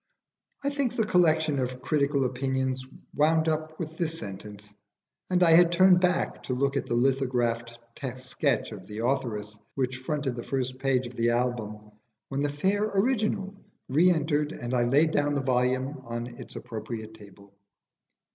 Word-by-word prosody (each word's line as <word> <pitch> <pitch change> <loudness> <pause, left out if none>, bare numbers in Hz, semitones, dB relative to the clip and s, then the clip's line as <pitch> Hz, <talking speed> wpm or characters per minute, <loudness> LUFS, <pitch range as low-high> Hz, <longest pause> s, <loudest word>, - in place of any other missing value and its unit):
I 280 - 0
think 280 -4 -1
the 225 - +1
collection 160 -6 +3
of 125 0 -2
critical 140 0 +1
opinions 130 0 -1 0.3
wound 160 +2 +3
up 155 0 -2
with 160 -1 -6
this 165 -1 -1
sentence, 105 -1 -9 0.6
and 180 -1 +3
I 165 - +6
had 170 +1 +7
turned 180 +1 +6
back 180 -1 +1
to 125 - -2
look 140 +2 0
at 140 - -1
the 120 - 0
lithographed 120 -2 0 0.4
sketch 130 +2 -1
of 95 -3 -9
the 110 +2 -4
authoress 115 -6 -1 0.2
which 130 -1 -1
fronted 135 -1 -2
the 120 - -4
first 130 -1 -3
page 135 -2 +1
of 120 +1 -9
the 115 0 +2
album, 110 -3 -2 0.4
when 135 0 -2
the 145 - +1
fair 190 +8 0
original 210 -2 0 0.4
re 160 +7 +5
entered 150 -2 +1
and 120 +1 -5
I 120 -1 +3
laid 145 +6 +4
down 145 -1 +1
the 140 - +1
volume 130 +2 0
on 120 -1 -4
its 120 -1 -10
appropriate 110 -2 -6
table. 100 -2 -16
135 Hz, 165 wpm, -27 LUFS, 120-160 Hz, 0.6 s, had